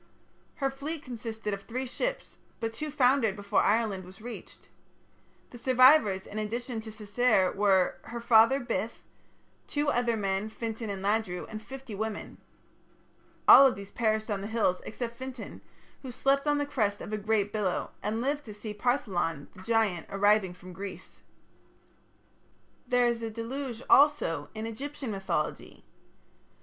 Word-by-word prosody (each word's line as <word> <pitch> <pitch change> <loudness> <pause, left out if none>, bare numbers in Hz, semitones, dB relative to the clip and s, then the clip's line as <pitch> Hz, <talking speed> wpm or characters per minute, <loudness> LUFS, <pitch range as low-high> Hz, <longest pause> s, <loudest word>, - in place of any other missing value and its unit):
Her 270 -1 -1
fleet 290 +3 -5
consisted 225 -3 -5
of 200 - -4
three 250 +5 -4
ships, - - -4 0.2
but 225 -1 -3
two 300 +7 -4
foundered 255 -6 +3
before 205 0 +1
Ireland 210 -3 +1
was 185 +2 -13
reached. 235 +2 -10 0.8
The 240 - -10
survivors 255 -6 +5
in 215 - -6
addition 230 +2 -3
to 220 - -9
Cessair 215 -2 +2
were, 195 -2 +3
her 235 +1 -6
father 230 +3 +5
Bith, 230 -3 -3 0.6
two 290 0 0
other 240 -3 +1
men, 195 +1 -1
Fintan 225 0 -5
and 195 -1 -4
Ladru, 200 -3 0
and 215 -1 -7
fifty 265 0 -9
women. 215 +1 -5 1.1
All 275 - +10
of 260 - 0
these 200 0 -10
perished 220 -1 0
on 200 -1 -1
the 200 - -4
hills 215 -5 +1
except 235 +1 -5
Fintan, 260 -2 -8 0.4
who 265 - -7
slept 275 +4 +1
on 295 0 +3
the 290 - 0
crest 210 -8 0
of 215 - -6
a - - 0
great 210 -1 0
billow, 205 -4 -1
and 220 +2 -2
lived 285 +3 -1
to 210 -3 -9
see 210 0 -6
Partholon, 195 - -1
the 185 - -12
giant, 215 -5 +1
arriving 200 -2 +3
from 180 +1 -12
Greece. 195 +2 -9 1.7
There 245 -1 +3
is 235 -1 -1
a 225 - -3
deluge 240 +2 -5
also 265 - +4
in 220 +1 -4
Egyptian 270 +2 -5
mythology. 195 -1 -3
225 Hz, 155 wpm, -29 LUFS, 205-250 Hz, 1.7 s, All